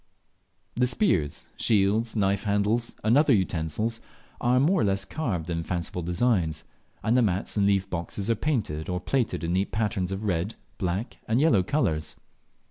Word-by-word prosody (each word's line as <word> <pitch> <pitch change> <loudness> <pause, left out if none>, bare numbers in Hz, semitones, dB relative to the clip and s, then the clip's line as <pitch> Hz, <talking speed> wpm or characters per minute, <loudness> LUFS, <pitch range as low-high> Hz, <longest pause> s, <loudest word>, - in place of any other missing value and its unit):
The 125 +1 +2
spears, 90 - 0
shields, 110 +2 +2
knife 100 0 +1
handles, 105 +3 +1
and 110 +3 +4
other 145 -1 +5
utensils 95 +5 -1 0.4
are 125 +1 +3
more 170 +7 +3
or - - +2
less 100 -1 +1
carved 95 - -3
in 85 0 -1
fanciful 85 +1 -3
designs, 85 -3 +1 0.4
and 115 +3 +2
the 125 - +5
mats 100 -3 0
and 100 -2 +3
leaf 100 -2 +2
boxes 90 +3 -3
are 115 - +3
painted 110 - -2
or 90 0 -1
plaited 120 0 -1
in 85 +1 -1
neat 95 +2 0
patterns 105 -4 -1
of 95 +2 -4
red, 95 +1 -1 0.2
black, 95 +4 -2
and 115 +3 +2
yellow 145 -10 +4
colours. 90 - -1
100 Hz, 165 wpm, -26 LUFS, 90-115 Hz, 0.4 s, other